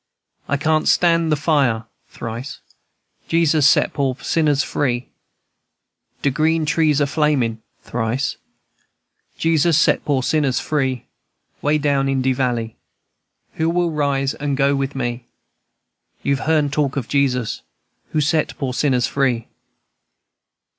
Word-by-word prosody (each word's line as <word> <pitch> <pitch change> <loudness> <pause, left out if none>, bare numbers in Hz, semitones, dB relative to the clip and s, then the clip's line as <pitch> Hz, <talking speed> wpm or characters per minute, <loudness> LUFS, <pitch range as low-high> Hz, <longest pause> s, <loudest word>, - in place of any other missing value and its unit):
I 140 - +1
can't 155 +1 +1
stand 165 -2 +3
the - - +4
fire. 140 -7 +1 0.2
(Thrice.) 115 +4 -6 0.7
Jesus 160 -3 +3
set - - +3
poor 135 -3 0
sinners 150 -3 +1
free, 125 -3 -2 1.1
De 140 - +2
green 160 +3 +1
trees 155 -2 +2
a 145 - +3
flamin'. 140 -6 0 0.2
(Thrice.) 120 +3 -2 1.0
Jesus 165 -1 +2
set - - +3
poor 135 -3 0
shiners 140 -4 +1
free, 130 -5 -1 0.6
Way 150 +1 +2
down 140 -2 +1
in 135 -1 0
de 130 0 +2
valley, 120 -4 -2 0.8
Who 160 +1 +1
will 175 0 +1
rise 140 -2 0
and 145 -2 -3
go 140 0 +3
with 135 0 -2
me? 120 -2 -3 1.0
You've 140 +1 -1
heern 150 -3 +2
talk 145 -2 0
of 125 -4 -3
Jesus 130 -5 0 0.5
Who 155 - 0
set 155 +1 0
poor 130 -3 -3
shiners 130 -2 +1
free." 130 -5 -1
140 Hz, 125 wpm, -20 LUFS, 130-155 Hz, 1.1 s, the